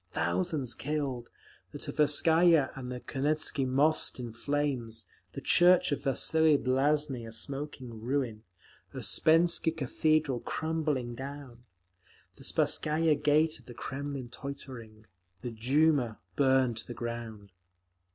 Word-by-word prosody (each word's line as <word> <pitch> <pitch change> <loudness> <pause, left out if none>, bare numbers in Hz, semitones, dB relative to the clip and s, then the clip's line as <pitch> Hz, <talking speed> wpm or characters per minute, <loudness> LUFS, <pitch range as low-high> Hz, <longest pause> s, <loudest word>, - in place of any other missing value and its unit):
Thousands 130 - -1
killed; 135 -5 -4 0.4
the - - -7
Tverskaya 160 +1 +3
and 125 -2 -7
the 125 - -5
Kuznetsky 140 -1 -1
Most 145 +3 +2
in 120 -2 -6
flames; 125 -4 -2 0.3
the - - -6
church 175 -2 +5
of 145 - -1
Vasili 155 +3 +3
Blazheiny 135 -1 0
a - - -9
smoking 130 -1 -5
ruin; 120 -3 -2 0.5
Usspensky 165 +1 +3
Cathedral 150 -1 +1
crumbling 150 -5 -2
down; 130 -2 -9 0.7
the - - -15
Spasskaya 155 +1 +2
Gate 155 +2 +1
of - - -22
the 120 - -10
Kremlin 135 -1 -5
tottering; 125 -5 -9 0.4
the 120 - -5
Duma 130 +1 +1 0.2
burned 130 -4 +2
to 115 - -7
the 120 - -7
ground. 115 -4 -7
135 Hz, 115 wpm, -30 LUFS, 120-150 Hz, 0.7 s, church